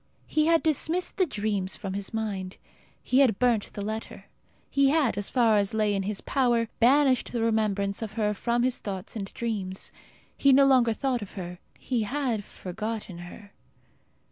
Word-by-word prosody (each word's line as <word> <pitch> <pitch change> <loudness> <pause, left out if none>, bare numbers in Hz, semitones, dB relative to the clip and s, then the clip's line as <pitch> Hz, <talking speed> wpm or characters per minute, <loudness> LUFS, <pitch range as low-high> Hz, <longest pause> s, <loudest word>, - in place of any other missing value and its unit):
He 305 0 +1
had 330 -1 +4
dismissed 320 +3 0
the 370 -2 +3
dreams 205 -6 -2
from 195 -3 -5
his 200 0 -4
mind; 200 -4 -4 0.5
he 255 - +2
had 245 -8 +4
burnt 235 -3 +1
the 205 - -5
letter. 220 +2 -6 0.4
He 275 -1 +3
had, 285 -7 +2
as 205 0 -1
far 230 -4 +3
as 200 +1 +1
lay 215 -1 +2
in 195 - 0
his 200 +1 -3
power, 240 -4 +1
banished 265 +2 +4
the 235 - -2
remembrance 210 -3 0
of 215 -2 -5
her 210 -2 0
from 235 +3 0
his 255 0 0
thoughts 190 -1 -6
and 195 -3 -5
dreams. 205 -6 -3 0.4
He 275 -1 +4
no 275 +1 +7
longer 250 -4 +4
thought 255 0 -1
of 205 - -8
her. 180 -2 -7 0.2
He 245 -3 -1
had 240 -2 -1
forgotten 205 0 -6
her.... 200 +4 -11
220 Hz, 175 wpm, -27 LUFS, 200-255 Hz, 0.5 s, no